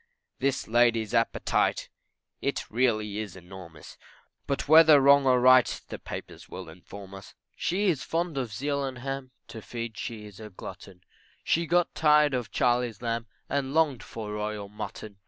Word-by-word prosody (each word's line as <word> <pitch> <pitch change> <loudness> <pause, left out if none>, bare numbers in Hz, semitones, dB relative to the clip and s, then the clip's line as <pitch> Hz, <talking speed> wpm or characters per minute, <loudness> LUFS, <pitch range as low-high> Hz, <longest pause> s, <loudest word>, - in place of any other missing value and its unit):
This 135 0 -1
lady's 115 -1 +2
appetite 115 -1 +1 0.5
It - - -3
really 110 -3 0
is 105 -4 -6
enormous, 90 -4 -12 0.5
But 140 - -2
whether 155 -1 +8
wrong 140 0 +5
or 125 -1 +5
right, 130 0 +5
The - - -6
papers - - -9
will - - -8
inform 95 +4 -12
us; 95 0 -12 0.2
She 195 +4 -1
is 160 -8 +1
fond 165 +2 -2
of 125 -5 -3
veal 140 +5 -2
and 130 -2 -4
ham, 135 +1 -5 0.2
To 110 - -8
feed 115 0 -6
she 110 -3 -6
is 105 -1 -13
a 110 -1 -9
glutton, 95 -1 -11 0.4
She 170 0 +1
got 175 +1 +2
tired 150 -2 +4
of 125 -4 -2
Charley's 120 -2 0
lamb, 115 0 -2 0.2
And 140 +1 -2
longed 150 -7 +2
for 110 -3 -7
royal 105 -1 -4
mutton. 105 0 -8
120 Hz, 160 wpm, -27 LUFS, 105-140 Hz, 0.5 s, whether